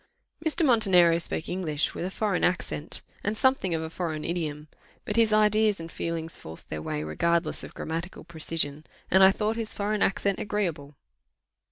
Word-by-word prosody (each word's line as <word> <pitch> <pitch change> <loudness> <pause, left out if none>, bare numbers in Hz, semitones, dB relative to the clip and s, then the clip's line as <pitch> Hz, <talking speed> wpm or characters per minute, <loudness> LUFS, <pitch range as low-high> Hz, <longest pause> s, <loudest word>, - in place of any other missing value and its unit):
Mr. 320 +1 +2
Montenero 185 - +5
spoke 160 -1 +2
English 160 -5 -1
with - - -5
a - - -2
foreign 200 -1 -1
accent, 175 -3 -1 0.2
and 210 +2 -1
something 260 -10 +2
of 160 - -2
a 160 - -5
foreign 160 -3 -3
idiom; 155 -3 -3 0.4
but 210 - -3
his 225 -1 +4
ideas 215 -1 +4
and 165 0 -8
feelings 165 -1 -4
forced 80 +1 -9
their 75 - -3
way 75 0 -3
regardless 170 - 0
of - - -10
grammatical 165 +3 -5
precision, 160 -3 -3 0.3
and 190 +1 +6
I 190 - +9
thought 215 +3 -1
his 225 -2 -3
foreign 210 0 -1
accent 200 0 +1
agreeable. 170 -9 -3
175 Hz, 170 wpm, -27 LUFS, 160-210 Hz, 0.4 s, I